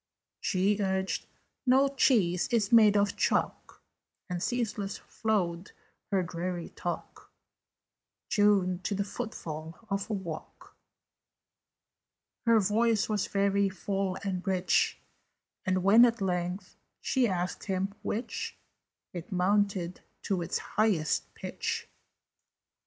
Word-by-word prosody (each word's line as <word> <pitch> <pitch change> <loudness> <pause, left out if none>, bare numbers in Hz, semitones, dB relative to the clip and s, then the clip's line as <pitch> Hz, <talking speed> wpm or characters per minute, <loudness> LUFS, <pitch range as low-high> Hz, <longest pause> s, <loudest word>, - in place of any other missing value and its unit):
She 195 +2 +1
urged 190 -1 -1 0.4
"No 265 +1 +5
cheese 220 -10 +2
is 220 -4 +1
made 215 -3 +7
of 205 0 +2
chalk": - - -1 0.5
And 175 -1 -2
ceaseless 215 -4 -2
flowed 185 -5 -2 0.4
her 195 -3 +2
dreary 175 0 -4
talk, - - -6 1.0
Tuned 195 -4 +3
to 205 - 0
the 200 - 0
footfall 165 -8 -6
of 200 +2 -1
a - - -1
walk. 175 -6 -7 1.7
Her 230 -1 +6
voice 220 +2 +2
was 210 -2 0
very 200 0 +2
full 195 0 -2
and 190 -2 -2
rich, 185 -1 +2 0.7
And, 185 -1 +1
when 215 +5 +7
at 235 -1 +1
length 180 0 -2 0.2
she 260 -3 +1
asked 180 -2 -2
him 195 0 -1
"Which?" 230 +4 -4 0.6
It 175 +1 -7
mounted 185 -1 +1 0.2
to 190 -3 0
its 170 - -1
highest 195 -8 0
pitch. - - -4
195 Hz, 110 wpm, -29 LUFS, 180-210 Hz, 1.7 s, made